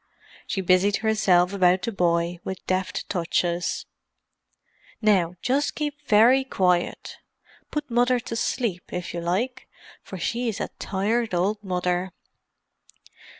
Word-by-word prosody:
She 195 - -1
busied 185 +2 +3
herself 190 -4 +3
about 185 -1 +3
the 230 - -1
boy 170 -2 0
with 190 -1 -6
deft 185 0 -2
touches. 175 -1 -1 1.1
"Now 190 -6 +2
just 280 +3 +1
keep 295 -1 -3
very 240 +5 +6
quiet—put 195 +7 -3
Mother 245 +1 +3
to 230 - -6
sleep, 225 -5 -2
if 180 -1 -4
you 170 - -3
like, 195 +10 -2 0.3
for 190 - -9
she's 230 +5 -2
a - - -3
tired 210 +2 -1
old 205 +4 0
mother." 180 -1 -1
190 Hz, 115 wpm, -25 LUFS, 180-230 Hz, 1.1 s, very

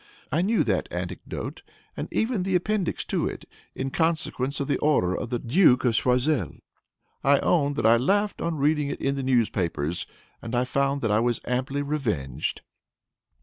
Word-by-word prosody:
I 155 +5 +2
knew 215 +5 +2
that - - 0
anecdote, - - -5 0.3
and - - -4
even 225 -3 0
the 185 0 0
appendix 190 0 0
to - - 0
it, - - -6 0.3
in 135 0 -3
consequence 155 -4 -1
of 140 - -1
the 145 - 0
order 120 -12 +2
of - - -4
the 120 - 0
Duke 130 +1 +4
of 120 - +3
Choiseul. 125 - +1 0.7
I 140 +1 +5
own 145 -5 +2
that 140 - -1
I 115 +1 +6
laughed 200 - +1
on 170 -2 -1
reading 150 +1 +2
it - - -4
in 135 - 0
the 140 - -3
newspapers, 90 - 0 0.3
and 115 +1 -4
I 120 - +3
found 140 +2 0
that 115 - 0
I 105 - +4
was 120 0 +1
amply 130 +3 -1
revenged." 105 - -2
135 Hz, 175 wpm, -26 LUFS, 120-155 Hz, 0.7 s, I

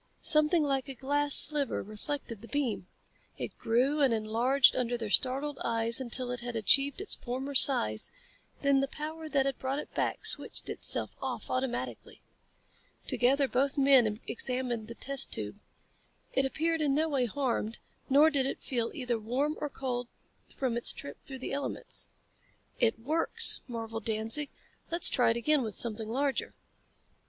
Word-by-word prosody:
Something 305 +1 +4
like 275 -1 -1
a 270 - -6
glass 290 +2 +1
sliver 295 -2 +3
reflected 225 +1 -6
the 230 - -11
beam. 250 -10 -2 0.5
It - - -6
grew 260 +6 +1
and 270 -3 +4
enlarged 235 +5 +3
under 245 -1 -1
their 220 -3 -5
startled 275 +4 +1
eyes 230 +1 0
until 250 0 +1
it 245 - -3
had 240 0 -5
achieved 275 - +3
its 405 - -2
former 265 +3 -5
size, 255 - +3 0.5
then 280 -1 +3
the 275 - 0
power 315 +2 -7
that 275 -3 +1
had 275 -1 -2
brought 265 +1 -2
it 295 - -7
back - - -2
switched - - -4
itself - - 0
off - - -4
automatically. 255 -1 -4 0.8
Together 270 +3 +2
both 270 +3 0
men 260 -6 +4
examined 245 -2 -3
the 235 - -8
test 275 +2 -1
tube. - - -4 0.7
It 270 - +2
appeared 325 +4 -1
in 285 -2 +2
no 315 +2 +1
way 270 -5 0
harmed, 235 -2 -2 0.3
nor 295 +4 +5
did 270 -3 +1
it - - -5
feel 235 -3 -2
either 250 -6 -2
warm 265 +8 -1
or 295 - -2
cold 250 -3 -4 0.4
from 250 -3 -3
its 240 - +3
trip 140 - -8
through 270 - -9
the 260 - -6
elements. 280 0 -2 0.7
"It 225 -2 +2
works!" 305 +9 +6
marveled 225 -2 -6
Danzig. 225 +7 0 0.4
"Let's 340 +1 +4
try 245 - +2
it 230 - +1
again 295 +5 +2
with 220 -4 -4
something 220 -2 -3
larger." 270 +3 -2
265 Hz, 160 wpm, -30 LUFS, 235-285 Hz, 0.8 s, works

